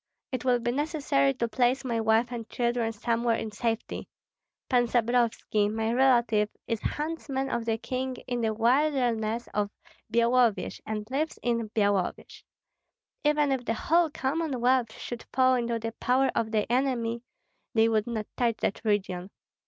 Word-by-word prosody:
It 255 -3 -3
will 250 -1 +3
be 240 0 -1
necessary 275 - +1
to 235 - -1
place 250 +3 +1
my 230 -2 0
wife 225 +2 +2
and 230 -2 -6
children 235 -1 0
somewhere 230 +1 0
in 220 -1 -4
safety. 225 +1 -3 0.6
Pan 245 -2 +3
Stabrovski, 230 -3 +1
my 220 +1 -1
relative, 235 -5 +3 0.2
is 230 -2 -2
huntsman 295 -3 -3
of 235 - -1
the 225 -1 0
king 255 +2 -3
in 245 -1 -2
the 220 -1 +1
wilderness 235 -2 +1
of 205 -1 0 0.4
Byalovyej, 235 -1 +2
and 215 -1 -3
lives 305 +4 -1
in 230 -2 0
Byalovyej. 200 -4 0 0.8
Even 295 -1 +3
if 265 -2 0
the 230 -1 -1
whole 335 +6 +2
Commonwealth 260 -5 0
should 240 -1 -7
fall 260 0 +4
into 235 -2 0
the 225 0 -4
power 260 +2 +2
of 225 - 0
the 215 -1 +1
enemy, 240 -3 0 0.5
they 225 0 +5
would 220 -1 +1
not 220 -3 -3
touch 235 -3 +1
that 195 - -1
region. 195 -4 -1
235 Hz, 155 wpm, -28 LUFS, 225-255 Hz, 0.8 s, they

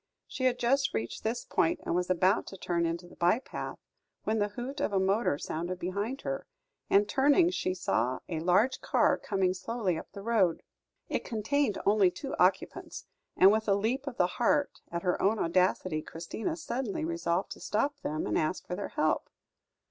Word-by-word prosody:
She 260 - -4
had 250 -1 +3
just 270 +4 +1
reached 110 +1 -3
this 225 +2 -2
point, 165 - +1
and - - -2
was 180 +1 0
about 185 +3 +2
to 195 - -8
turn 170 -2 0
into 170 +2 -4
the - - -15
by 175 +5 +3
path, 255 - -6 0.5
when 220 +1 0
the 205 - +2
hoot 250 +7 -6
of - - 0
a 195 - +2
motor 195 -4 +2
sounded 175 +5 -4
behind 200 +9 -3
her, - - -4 0.4
and 205 +1 +4
turning, 290 - +4
she 185 - -1
saw 130 -7 0
a 165 -3 -3
large 185 +10 +2
car - - +3
coming 190 -3 0
slowly 190 -2 -2
up - - -12
the 200 - -8
road. 200 -7 +2 0.4
It - - -2
contained 230 +2 0
only 200 -2 +5
two 270 - -6
occupants; - - 0 0.3
and 190 +2 +8
with 220 +1 0
a 200 - +4
leap 245 +7 -1
of 255 - -5
the 180 - +4
heart 260 +10 0
at 170 0 -3
her 180 -1 0
own 210 +3 +3
audacity, 180 -2 +1
Christina 170 - -4
suddenly 240 - -3
resolved 170 +2 -1
to - - -7
stop 280 +7 -1
them, 155 - -3
and 105 - +1
ask 155 +4 -1
for 180 - -4
their 200 - -4
help. 155 0 0
195 Hz, 190 wpm, -30 LUFS, 175-240 Hz, 0.5 s, and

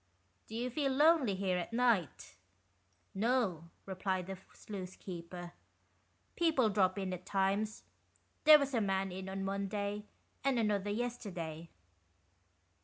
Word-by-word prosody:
"Do 220 - -8
you 245 +2 -2
feel 275 +1 0
lonely 290 - +4
here 185 -1 0
at 175 - -5
night? 230 -8 +1 0.4
" 90 -1 -41
"No," 210 -10 +1 0.2
replied 190 -1 -2
the 190 0 -6
sluice 190 -3 -7
keeper, 175 -1 -8 0.8
"people 310 - +3
drop 190 -2 +2
in 190 -2 -2
at 180 0 -6
times. 200 +3 0 0.6
There 305 0 +11
was 280 -1 -2
a 230 - +2
man 195 -1 0
in 190 +1 -6
on 195 0 -3
Monday, 200 +1 -2 0.4
and 270 -2 +2
another 205 -3 +1
yesterday." 195 -8 -4
200 Hz, 130 wpm, -34 LUFS, 185-235 Hz, 0.8 s, There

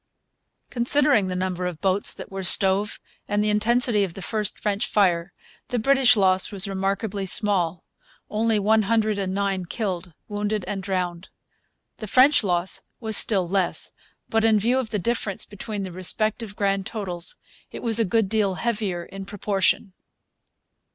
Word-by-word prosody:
Considering 255 -3 +2
the 185 - -4
number 180 -1 -3
of 175 -3 -6
boats 195 0 +1
that - - -10
were 195 0 -5
stove 190 +3 +5 0.3
and 205 0 0
the 210 - +1
intensity 225 0 +1
of 180 -4 -5
the 195 - -8
first 210 -2 -2
French 205 +2 -2
fire, 175 -3 +1 0.4
the 245 - -3
British 265 +1 +4
loss 190 0 +2
was 200 0 +1
remarkably 195 +1 -3
small, 180 -5 +3 0.4
only 220 +1 0
one 215 +2 +2
hundred 215 -1 0
and 190 -1 -2
nine 195 -2 -1
killed, 180 -2 -5
wounded, 210 -1 -3
and 195 -1 -4
drowned. 180 -2 -4 0.7
The 215 - -7
French 260 +5 +4
loss 180 -1 -1 0.2
was 220 -2 +1
still 195 -5 +6
less; 190 0 -1 0.4
but, 225 0 0
in 220 -1 +4
view 240 +5 +1
of 250 -4 -4
the 215 - -2
difference 210 -1 -2
between 205 0 -6
the 190 - -6
respective 215 +4 0
grand 195 -1 -1
totals, 180 -6 -4 0.4
it - - -9
was 230 -1 +6
a - - +3
good 220 +1 0
deal 200 -2 0
heavier 205 -6 -3
in 195 0 -10
proportion. 195 -2 -1
200 Hz, 160 wpm, -23 LUFS, 190-220 Hz, 0.7 s, still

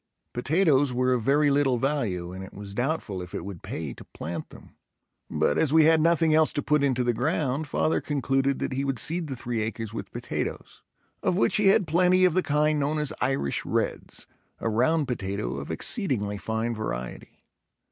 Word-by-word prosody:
Potatoes 145 0 +2
were 125 +1 +2
of 125 - 0
very 145 +4 +3
little 140 -3 +2
value 115 -10 -1
and 95 +1 -7
it 95 - -11
was 100 -1 -8
doubtful 120 - -2
if 90 -1 -8
it - - -4
would 95 -4 -7
pay - - -5
to - - -12
plant - - -7
them, - - -15 0.5
but 75 - +1
as 155 - +2
we 160 0 +6
had 160 0 +5
nothing 165 -1 +3
else 155 0 +4
to 145 - -2
put 150 -1 +2
into 130 -3 +1
the 120 0 +1
ground 145 +3 -1
father 155 - +1
concluded 135 -1 0
that - - -3
he 135 +1 -1
would 135 -2 -1
seed 165 +4 -1
the 135 - -4
three 120 -2 -3
acres 110 0 -4
with - - -6
potatoes, - - -5 0.4
of 180 - +1
which - - +3
he 210 -2 +3
had 195 -1 +5
plenty 180 +3 +4
of 180 - +3
the 185 - +3
kind 150 -1 +1
known 145 +2 0
as 150 -2 -1
Irish 130 - 0
Reds, - - -3 0.3
a 115 - -2
round 140 +7 +2
potato 100 - -3
of 70 - -6
exceedingly 105 - -1
fine 110 +2 -2
variety. 65 - -6
135 Hz, 195 wpm, -26 LUFS, 110-155 Hz, 0.5 s, we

